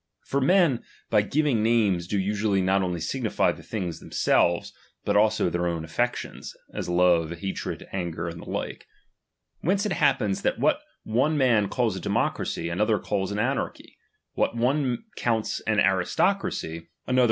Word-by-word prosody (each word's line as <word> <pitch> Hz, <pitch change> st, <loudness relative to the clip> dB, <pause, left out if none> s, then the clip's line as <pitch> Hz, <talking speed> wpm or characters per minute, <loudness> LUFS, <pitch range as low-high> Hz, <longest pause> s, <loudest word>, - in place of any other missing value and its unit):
For 140 Hz, -, 0 dB
men, 160 Hz, -4 st, +3 dB, 0.3 s
by 105 Hz, -2 st, +5 dB
giving 135 Hz, 0 st, +1 dB
Hames, 105 Hz, -7 st, +2 dB
do 100 Hz, -, -1 dB
usually 100 Hz, +1 st, +1 dB
not 95 Hz, +1 st, +2 dB
only 90 Hz, -2 st, -1 dB
signify 110 Hz, +8 st, 0 dB
the -, -, -10 dB
things 90 Hz, -7 st, -4 dB
them -, -, -13 dB
selves, 85 Hz, 0 st, +2 dB, 0.3 s
but 100 Hz, -, +1 dB
also 110 Hz, 0 st, +3 dB
their 85 Hz, 0 st, 0 dB
own 85 Hz, -2 st, -2 dB
affections, 120 Hz, +10 st, -3 dB, 0.2 s
as -, -, -4 dB
love, 90 Hz, -2 st, +3 dB
ha 90 Hz, +3 st, -4 dB
tred, -, -, -5 dB
anger, 85 Hz, -3 st, -3 dB
and 85 Hz, 0 st, -6 dB
the -, -, -10 dB
like. -, -, -4 dB, 0.7 s
Whence 195 Hz, +5 st, +1 dB
it 210 Hz, -, -1 dB
happens 105 Hz, -, +2 dB
that -, -, 0 dB
^ivbat -, -, +2 dB, 0.2 s
one 135 Hz, +8 st, +1 dB
man 115 Hz, -7 st, +3 dB
calls 120 Hz, -6 st, 0 dB
a -, -, -4 dB
democracy, 85 Hz, -, -1 dB
another 105 Hz, +6 st, +1 dB
calls 100 Hz, -1 st, -2 dB
an 100 Hz, -, -3 dB
ctnarchy; 125 Hz, +5 st, -2 dB, 0.4 s
what 120 Hz, -, 0 dB
one 125 Hz, +1 st, +1 dB
counts 115 Hz, -2 st, 0 dB
au 110 Hz, -, +3 dB
aristocracy, 105 Hz, -, +1 dB
another 80 Hz, -, -5 dB
94 85 Hz, -, -20 dB, 0.2 s
DOMINION. 125 Hz, -, 0 dB
CHAP. -, -, +6 dB
105 Hz, 175 wpm, -26 LUFS, 90-125 Hz, 0.7 s, CHAP